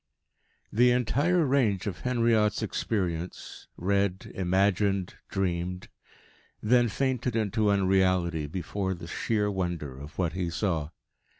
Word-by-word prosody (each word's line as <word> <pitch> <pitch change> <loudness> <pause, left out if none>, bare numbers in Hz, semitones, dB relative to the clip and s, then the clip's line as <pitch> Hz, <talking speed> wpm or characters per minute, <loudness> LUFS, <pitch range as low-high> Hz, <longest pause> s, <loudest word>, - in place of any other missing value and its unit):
X - - -42
The 125 +3 +5
entire 145 +8 +2
range 125 -9 +2
of 95 -4 -4
Henriot's 115 -4 +2
experience, 90 -5 -3
read, 100 0 0
imagined, 95 +1 +1 0.2
dreamed, 90 -1 -2 0.7
then 120 +2 +3
fainted 125 0 -1
into 110 -1 +1
unreality 95 -5 +2
before 95 +4 -3
the 85 - -9
sheer 105 +4 -1
wonder 85 -8 -3
of 75 +2 -11
what 85 -3 0
he 90 -2 -2
saw. 85 -4 -1
95 Hz, 115 wpm, -28 LUFS, 90-110 Hz, 0.7 s, The